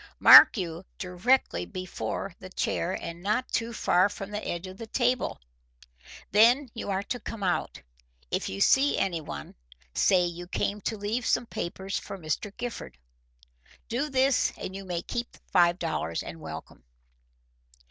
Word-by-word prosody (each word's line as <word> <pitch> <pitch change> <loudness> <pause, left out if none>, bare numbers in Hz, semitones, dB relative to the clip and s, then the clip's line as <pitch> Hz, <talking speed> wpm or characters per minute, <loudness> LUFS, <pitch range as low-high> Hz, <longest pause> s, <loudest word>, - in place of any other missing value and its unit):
Mark - - +10
you, 170 -2 -4
directly 200 +8 +1
before 185 -2 -5
the 185 - -10
chair 180 -1 -1
and 170 0 -7
not 210 +6 0
too 230 0 -1
far 185 -4 +3
from 200 0 -7
the 210 0 -4
edge 175 +2 -3
of 185 0 -9
the 230 - -7
table. 250 +2 0 0.9
Then 240 +6 +5
you 225 - -6
are 195 0 -1
to 245 +4 -4
come 225 -4 -7
out. 180 -2 -1 0.5
If - - -1
you 95 +1 -5
see 275 +2 +4
anyone, 165 - -3 0.4
say 180 -2 +3
you 175 0 -6
came 205 +2 -2
to 220 +3 -3
leave 215 +4 -2
some - - +2
papers 190 -1 -4
for 195 - -8
Mr. 170 +4 -3
Gifford. 230 - -6 0.9
Do 270 +6 -1
this 265 -1 +2
and 190 - -6
you 195 0 -7
may 175 -2 -3
keep 240 0 -4
the - - -18
five 175 -1 +4
dollars 155 - -2
and 80 -1 -9
welcome." 80 -5 -9
195 Hz, 155 wpm, -27 LUFS, 175-230 Hz, 0.9 s, Mark